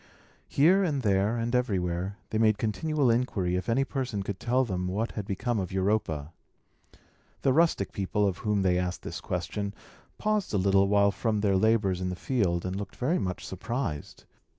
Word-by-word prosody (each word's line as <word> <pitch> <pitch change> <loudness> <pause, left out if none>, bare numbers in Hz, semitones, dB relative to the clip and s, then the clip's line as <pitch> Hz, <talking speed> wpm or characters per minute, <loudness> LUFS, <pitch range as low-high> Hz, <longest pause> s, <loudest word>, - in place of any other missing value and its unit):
Here, 180 +8 +4
and 145 -7 0
there, 100 +2 +2
and 115 +1 -2
everywhere, 95 -5 0
they 110 - 0
made 110 -2 +4
continual 130 +5 +1
inquiry 105 -7 0
if 90 +5 -2
any 125 +4 +3
person 130 -8 -3
could 100 -1 -5
tell 125 +4 +2
them 90 -4 -2
what 105 +5 -1
had 105 -2 -5
become 115 +3 -1
of 95 -3 -3
Europa. 95 -6 -1 1.1
The 135 - +4
rustic 160 - +2
people, 100 +1 0
of 95 -1 -2
whom 105 -2 0
they 90 -1 +3
asked 90 0 -3
this - - -6
question, 100 -1 -3 0.4
paused 210 - 0
a - - +3
little 95 +1 +3
while 100 0 +4
from 105 0 -1
their 100 -2 +2
labours 100 -3 +2
in 90 - -1
the 90 - -3
field, 90 -7 0
and 90 0 -2
looked 100 0 -6
very 155 +9 0
much 90 -1 -3
surprised. 105 - -4
105 Hz, 180 wpm, -28 LUFS, 95-120 Hz, 1.1 s, Here